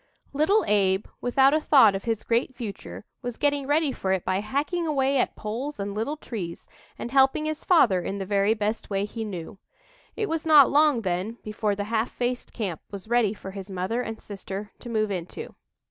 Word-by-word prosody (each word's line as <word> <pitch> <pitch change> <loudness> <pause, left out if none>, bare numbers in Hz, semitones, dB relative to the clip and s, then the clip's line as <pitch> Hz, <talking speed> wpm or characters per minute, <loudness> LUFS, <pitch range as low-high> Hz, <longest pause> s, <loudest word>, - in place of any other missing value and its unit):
Little 350 +10 +3
Abe, 195 -1 +2 0.2
without 265 +3 +4
a 310 - +4
thought 275 -9 +6
of 195 +3 -4
his 225 -2 -1
great 240 +2 0
future, 195 - -7 0.2
was 245 -1 -5
getting 285 -2 0
ready 295 0 +2
for 190 -6 -2
it 190 - -2
by 185 +1 +1
hacking 295 - -1
away 275 -2 +2
at - - 0
poles 235 +6 -5
and 200 0 -3
little 225 +9 -2
trees 190 - -6 0.3
and 240 - -6
helping 270 +3 +4
his 310 0 -3
father 230 - +4
in 195 - -4
the 195 - -4
very 200 +2 +2
best 215 +1 -2
way 200 0 0
he 225 +2 -5
knew. 190 -1 -7 0.6
It 430 - -1
was 325 -3 -2
not 300 -4 +7
long, 295 -4 +4
then, 190 +4 -2
before 215 -1 -1
the 205 - -2
"half 220 +2 -1
faced 245 0 -3
camp" 190 -8 -4
was 200 0 -8
ready 235 -3 +2
for 190 - -8
his 195 0 -8
mother 190 +6 -2
and 225 -2 -5
sister 200 0 -7
to 240 - -9
move 215 -2 0
into. 180 -2 -5
225 Hz, 200 wpm, -26 LUFS, 200-275 Hz, 0.6 s, not